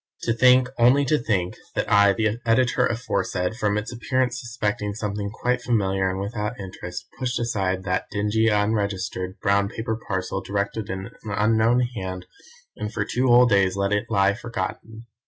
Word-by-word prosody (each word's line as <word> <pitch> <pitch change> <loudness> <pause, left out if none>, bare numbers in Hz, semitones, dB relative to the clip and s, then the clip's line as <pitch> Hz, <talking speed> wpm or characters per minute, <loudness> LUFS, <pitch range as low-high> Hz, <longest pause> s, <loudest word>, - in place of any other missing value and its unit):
To 115 - +1
think 125 +2 +5
only 130 +4 +5
to 150 +3 +2
think 95 -7 -1 0.2
that - - -1
I, 100 -1 +6
the 110 +1 0
Editor 125 +2 +3
aforesaid, 110 -5 -2
from 105 -3 0
its 105 +3 -4
appearance 125 0 -1
suspecting 105 -4 -2
something 105 -1 -3
quite 125 +3 -1
familiar 95 -5 +1
and 95 +1 -3
without 105 +3 -4
interest, 90 -2 -7
pushed 125 -2 -1
aside 95 -5 -1
that 95 0 -1
dingy, 105 +2 +1
unregistered, 100 -3 -1
brown 100 0 +2
paper 110 +1 -3
parcel 95 -4 -3
directed 100 +1 -3
in 95 +3 -5
an 110 - -7
unknown 110 +3 +3
hand, 95 -7 -4 0.5
and 105 0 -5
for 110 -3 -2
two 125 +4 0
whole 120 0 +7
days 100 -5 +3
let 100 +1 0
it 105 - 0
lie 100 0 +3
forgotten. 110 +1 -6
105 Hz, 165 wpm, -24 LUFS, 100-120 Hz, 0.5 s, whole